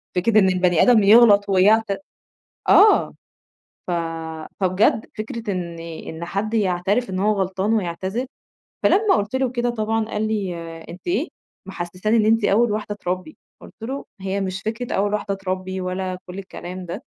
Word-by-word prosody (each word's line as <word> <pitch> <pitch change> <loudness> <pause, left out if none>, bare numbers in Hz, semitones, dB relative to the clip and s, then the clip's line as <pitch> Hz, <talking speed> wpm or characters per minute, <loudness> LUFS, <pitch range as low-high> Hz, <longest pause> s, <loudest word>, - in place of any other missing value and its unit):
فكرة 215 +4 +4
إن 190 -2 +4
البني 180 -2 +2
آدم 230 -4 +5
يغلط 205 -1 +6
ويعت 210 +4 +4 0.8
آه. 420 +2 +6 0.7
ف - - -2 0.7
فبجد 190 +4 +2
فكرة 225 0 -4
إن 170 -3 -4
إن 165 0 -7
حد 200 +5 -3
يعترف 200 +3 +1
إن 185 0 -3
هو 210 +2 +2
غلطان 190 +3 -1
ويعتذر، 190 +4 -2 0.6
فلما 415 +1 +4
قُلت 210 +4 -2
له 260 -1 +1
كده 245 -1 -1
طبعًا 220 -1 -1
قال 215 0 -2
لي 200 -5 -2 0.4
أنتِ 180 - -11
إيه، 350 - 0 0.4
محسّساني 185 +5 -1
إن 215 - +3
أنتِ 225 0 +3
أول 225 +2 +3
واحدة 210 0 -3
تربّي، 185 +9 -4 0.2
قُلت - - -13
له: 265 +5 -5 0.2
"هي 195 +1 -2
مش 190 0 -3
فكرة 230 +3 -4
أول 205 +1 0
واحدة 210 -1 -1
تربّي 185 0 -4
ولا 185 0 -3
كل 180 +2 -8
الكلام 185 -1 -8
ده، 170 - -6
200 Hz, 155 wpm, -22 LUFS, 185-225 Hz, 0.8 s, يغلط